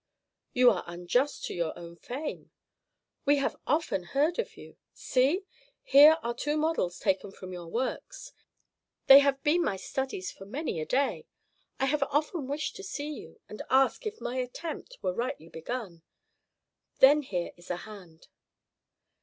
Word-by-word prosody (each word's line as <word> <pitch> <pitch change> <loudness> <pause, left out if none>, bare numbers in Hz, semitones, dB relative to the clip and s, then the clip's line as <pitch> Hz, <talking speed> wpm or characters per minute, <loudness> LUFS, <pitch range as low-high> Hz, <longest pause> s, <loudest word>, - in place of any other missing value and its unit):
"You 250 -1 +6
are 185 - -2
unjust 180 +11 -1
to - - -4
your 170 -2 -2
own 170 0 -10
fame. 270 - -6 0.7
We 285 0 +4
have 275 0 0
often 300 - +1
heard 290 - 0
of 470 - -3
you. - - -13 0.2
See, 275 +9 +1 0.4
here 295 +3 +8
are 235 - -1
two 295 +5 -1
models 305 - 0
taken 195 -1 0
from 185 -1 -9
your 175 -1 -7
works. 260 - -4 0.7
They 270 +1 +11
have 280 -1 +1
been 325 +4 +3
my 200 - 0
studies 190 -2 -4
for 195 - -12
many 255 - -3
a 155 - -5
day. 275 +2 0 0.5
I 270 - +2
have 295 +2 0
often 295 +1 0
wished 285 +2 -3
to 395 - -9
see 300 -6 -4
you, - - -11
and 210 - -8
ask 270 - +3
if 430 +1 -6
my 245 +2 -4
attempt 320 - -5
were 180 - 0
rightly 235 - -4
begun. 175 0 -6 1.0
Then 290 +3 +7
here 180 -10 -3
is 175 0 -16
a 180 - -1
hand." 185 -7 -13
260 Hz, 160 wpm, -29 LUFS, 185-295 Hz, 1.0 s, They